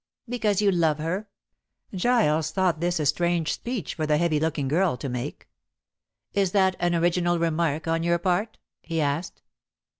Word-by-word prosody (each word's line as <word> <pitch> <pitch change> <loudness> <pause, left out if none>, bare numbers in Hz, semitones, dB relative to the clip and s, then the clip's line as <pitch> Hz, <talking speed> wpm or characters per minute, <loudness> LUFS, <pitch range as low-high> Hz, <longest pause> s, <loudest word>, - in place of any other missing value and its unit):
"Because 215 -4 0
you 200 - +4
love 165 -4 +2
her." 180 +7 -3 0.7
Giles 180 -7 +2
thought 180 -1 +1
this 175 0 0
a 150 - 0
strange 170 +2 +1
speech 235 - -4
for 155 -2 -3
the 150 0 +3
heavy 155 -2 +1
looking 155 -3 -1
girl 165 0 +1
to 135 - -5
make. 125 -1 -5 0.9
"Is 195 -3 +1
that 190 -2 +3
an 175 0 +1
original 175 +1 +2
remark 165 -1 0
on 165 0 +1
your 170 +1 +2
part?" 185 +5 -1 0.2
he 165 -1 -3
asked. 145 +3 -2
170 Hz, 160 wpm, -25 LUFS, 155-185 Hz, 0.9 s, you